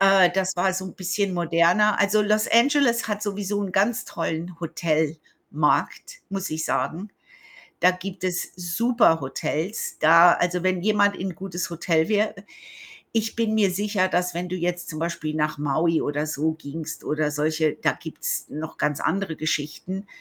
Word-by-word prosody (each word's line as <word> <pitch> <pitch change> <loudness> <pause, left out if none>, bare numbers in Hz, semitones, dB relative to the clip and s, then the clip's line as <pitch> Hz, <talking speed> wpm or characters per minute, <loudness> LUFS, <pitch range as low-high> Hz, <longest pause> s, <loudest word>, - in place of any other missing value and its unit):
Äh, 195 -2 +6
das 190 0 0
war 185 +1 +1
so 190 0 -3
'n 185 - -8
bisschen 190 +1 -1
moderner 175 +5 +3
also, 205 +1 +3
Los 215 +1 +2
Angeles 235 -1 +4
hat 210 -1 -2
sowieso 205 0 -2
'n 195 - -4
ganz 205 +5 +1
tollen 165 +1 -4
Hotelmarkt, 160 - -1
muss 195 -1 -3
ich 155 0 -3
sagen. 190 +6 -2 0.7
Da 180 - +6
gibt 185 +1 -7
es 180 -1 -2
super 185 0 +2
Hotels. 155 +8 -3
Da 170 +2 +7
also, 180 0 0
wenn 185 -1 +1
jemand 205 0 +2
in 185 -2 -4
gutes 180 -1 -5
Hotel 165 -1 0
wäre 215 0 +1 0.8
ich 225 0 -1
bin 225 -2 0
mir 205 -3 +3
sicher, 200 0 0
dass 180 0 0
wenn 180 +1 -3
du 185 - -3
jetzt 175 0 -2
zum 155 - -6
Beispiel 160 -2 -3
nach 150 0 -1
Maui 155 +3 +1
oder 145 +1 -2
so 155 +1 -1
gingst 155 +1 -7
oder 150 0 0
solche 155 +1 0
da - - +3
gibt's - - -5
noch 155 +2 -6
ganz 150 -1 -1
andere 185 -2 -1
Geschichten. 155 +6 -3
180 Hz, 165 wpm, -24 LUFS, 160-200 Hz, 0.8 s, Da